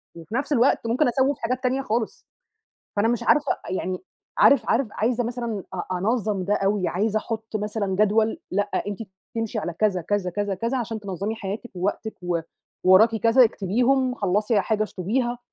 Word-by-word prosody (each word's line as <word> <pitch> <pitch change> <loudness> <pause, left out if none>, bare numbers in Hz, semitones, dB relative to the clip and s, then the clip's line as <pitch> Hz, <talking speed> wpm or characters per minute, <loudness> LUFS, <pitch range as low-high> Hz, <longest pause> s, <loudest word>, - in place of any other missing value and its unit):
وفي 165 +7 -8
نفس 290 +3 0
الوقت 240 -2 +3
ممكن 250 +5 +2
أسَوّف 265 +3 +2
حاجات 255 +3 -2
تانية 260 +2 +1
خالص. 240 - -3 0.7
فأنا 205 +2 +2
مش 240 -1 0
عارفة، 295 -2 +3
أ - - -9
يعني 185 -1 -2 0.4
عارف 280 - +5
عارف 235 +1 +2
عايزة 240 +3 0
مثلًا 235 -4 -3
أ 185 0 -3
أنَظّم 210 -1 0
ده 205 - +2
أوي، 195 -1 +1
عايزة 210 +4 0
أحُط 225 0 -5
مثلًا 210 -1 -2
جدول، 215 +2 +2
لأ 205 +2 +2 0.2
أنتِ 205 0 -4 0.4
تمشي 225 -1 -2
على 170 +1 -4
كذا، 190 -1 +1
كذا، 195 +1 -1
كذا، 205 0 -1
كذا 230 +7 -1
عشان 225 -2 -3
تنَظّمي 200 +2 -4
حياتِك 215 +3 -6
ووقتِك 200 +4 -2
و 175 -1 0 0.5
وراكِ 220 +5 +6
كذا 230 +3 +5
اكتبيهم، 250 +6 +1
خلّصي 205 +1 +1
حاجة 215 +3 0
اشطُبيها، 240 +6 -2
220 Hz, 170 wpm, -24 LUFS, 200-240 Hz, 0.7 s, وراكِ